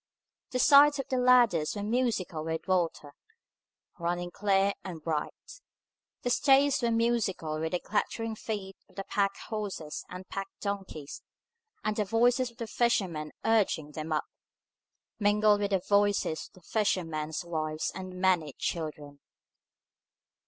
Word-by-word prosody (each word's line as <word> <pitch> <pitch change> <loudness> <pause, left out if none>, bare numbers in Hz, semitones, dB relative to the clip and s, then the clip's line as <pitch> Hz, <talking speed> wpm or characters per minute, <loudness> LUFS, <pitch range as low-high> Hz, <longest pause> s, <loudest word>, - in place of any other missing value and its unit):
The 255 - -2
sides 290 +3 +7
of 275 - -4
the 260 - 0
ladders 240 -11 +4
were 205 - -3
musical 215 -8 -1
with 160 +2 -4
water, 170 -5 0 0.9
running 175 +1 -2
clear 200 0 +2
and 180 -4 -6
bright. 155 - -4 0.6
The 245 - 0
staves 275 +2 +4
were 235 - +2
musical 225 -9 0
with 160 +1 -3
the 180 - +1
clattering 225 +2 -2
feet 205 -3 -5
of - - -23
the 195 - -4
pack 200 0 0
horses 205 -9 -4
and 185 +1 -8
pack 195 0 -4
donkeys, 195 -8 -5 0.6
and 215 - 0
the 210 - +1
voices 240 +4 +2
of 235 - -22
the 235 - -4
fishermen 185 -11 0
urging 205 -9 +2
them 155 +1 -6
up, 155 - 0 0.9
mingled 205 0 +4
with 200 - 0
the 190 -3 0
voices 205 -5 +2
of - - -31
the - - -22
fishermen's 165 -7 -1
wives 155 -2 -2
and 185 -1 -7
their 180 - -9
many 175 -6 +2
children. 150 -3 -4
195 Hz, 145 wpm, -29 LUFS, 165-225 Hz, 0.9 s, sides